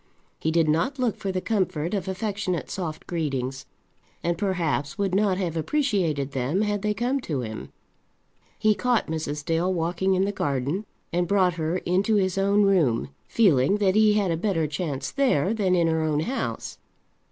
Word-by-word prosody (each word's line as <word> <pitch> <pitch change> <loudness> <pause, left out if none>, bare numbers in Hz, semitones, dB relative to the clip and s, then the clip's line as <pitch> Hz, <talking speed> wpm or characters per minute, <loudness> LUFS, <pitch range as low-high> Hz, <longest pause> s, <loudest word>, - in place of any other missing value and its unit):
He 160 - 0
did 165 0 +2
not 165 - +1
look 250 -4 0
for 195 - -3
the 185 0 -2
comfort 185 -6 -1
of 195 -3 -2
affectionate 195 -2 -2
soft 160 -5 -4
greetings, 135 -6 -3 0.6
and 170 0 +1
perhaps 170 -5 -1
would 200 -2 -1
not 195 -1 +2
have 175 -4 -2
appreciated 165 - 0
them 135 +8 0
had 205 -1 0
they 210 0 0
come 245 +6 0
to 150 - -3
him. 110 -2 -6 0.9
He 215 0 +3
caught 245 +2 +1
Mrs. 150 -2 -3
Dale 165 +3 +1
walking 180 +2 0
in 190 +1 +2
the 200 - -1
garden, 145 +3 -2 0.3
and 175 0 +1
brought 185 -1 +3
her 165 +1 -1
into 190 +5 +1
his 190 -2 +1
own 200 +1 +3
room, 160 - +2 0.2
feeling 185 - +3
that 195 -2 +2
he 215 0 +5
had 205 -4 +1
a 165 - 0
better 170 -3 0
chance 145 -3 -3
there 225 - +2
than 195 -5 +1
in 170 -1 +3
her 160 -1 +1
own 155 -1 +1
house. 250 +11 -3
180 Hz, 175 wpm, -25 LUFS, 155-205 Hz, 0.9 s, he